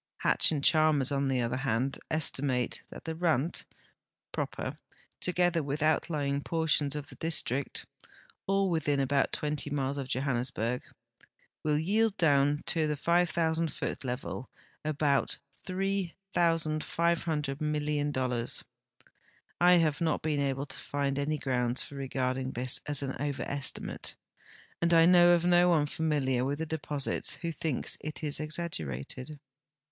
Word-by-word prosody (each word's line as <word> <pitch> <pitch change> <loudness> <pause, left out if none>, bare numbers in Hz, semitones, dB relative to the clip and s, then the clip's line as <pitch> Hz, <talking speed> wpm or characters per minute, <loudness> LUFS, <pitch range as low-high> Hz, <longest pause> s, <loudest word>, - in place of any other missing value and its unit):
Hatch - - +3
and 145 -3 -1
Chalmers, 155 -4 +4
on 140 0 +1
the 130 -2 +1
other 120 +2 -1
hand, 130 0 -1
estimate 135 -5 0
that - - -10
the 160 - -2
Rand 160 -2 +1 0.7
proper, - - -3 0.4
together 175 -2 +1
Avith 145 +1 -2
outlying 150 -3 +1
])ortions 155 -3 +1
of 150 -1 -4
the - - -10
district 145 -4 0 0.6
(all 195 0 +2
Avithin 145 -4 +1
about 135 0 +2
20 150 -1 -2
miles 140 -1 -1
of 135 - -4
Johannesburg), 125 -2 0 0.8
Avill 150 +1 +1
yield 215 +2 +2
doAvn 145 -2 +3
to 160 -2 +2
the 150 -1 -1
5,000 165 -1 +2
foot - - -4
level 125 0 -4 0.3
about 145 -2 +1 0.3
3,500 170 -5 0
million 150 -1 0
dollars. 125 -3 -1 1.0
I 180 +1 +7
have 165 -3 +3
not 160 -2 +1
been 155 -2 0
able 135 0 -1
to - - -4
find 140 -1 -1
any 150 +2 0
grounds 125 -3 0
for - - -11
regarding 130 -1 -2
this 125 +1 -1
as 145 -1 +2
an 135 -1 -3
overestimate, 140 -1 -3 0.7
and 170 0 +4
I 165 0 +7
know 175 0 +7
of 175 0 +2
no 175 0 +5
one 155 -4 +4
familiar 145 -5 0
Avith 140 +2 -1
the 160 - -2
de])Osits 150 -3 -1
Avho 165 -2 -4
thinks 155 -6 -1
it 155 +1 -6
exaggerated. 145 - -3
150 Hz, 135 wpm, -30 LUFS, 135-165 Hz, 1.0 s, I